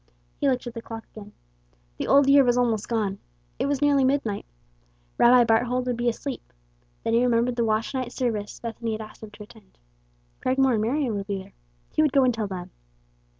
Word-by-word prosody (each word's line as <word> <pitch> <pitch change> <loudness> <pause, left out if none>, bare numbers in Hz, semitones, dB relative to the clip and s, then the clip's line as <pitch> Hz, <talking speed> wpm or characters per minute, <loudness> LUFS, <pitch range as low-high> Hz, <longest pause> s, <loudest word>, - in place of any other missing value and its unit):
He 280 - +2
looked 255 -1 -1
at 240 - -6
the 230 - -6
clock 225 -1 -8
again. 210 -1 -11 0.7
The - - -3
old 280 0 +5
year 280 0 +7
was 245 -1 +2
almost 230 -4 0
gone. 210 -4 -1 0.4
It - - 0
was 285 0 0
nearly 285 -2 +4
midnight. 260 -6 0 0.7
Rabbi 245 +1 +7
Barthold 245 +3 +1
would 250 -1 -1
be 240 +1 +1
asleep. 260 +3 -6 0.5
Then 225 - -1
he 230 - +4
remembered 240 0 +2
the 235 -1 +1
watch 220 +3 0
night 255 -2 -3
service 220 -6 -3
Bethany 230 -1 -4
had 215 - -4
asked 215 0 -11
him 220 - -9
to 210 0 -12
attend. 60 - -18 0.6
Cragmore 265 0 +2
and 215 - +1
Marion 250 +2 0
would 200 0 -5
be 200 -1 -2
there. - - -18 0.4
He - - +1
would 300 -3 +2
go 275 - +5
and 250 -1 +3
tell 220 -2 -3
them. 185 -2 -7
235 Hz, 205 wpm, -25 LUFS, 220-260 Hz, 0.7 s, year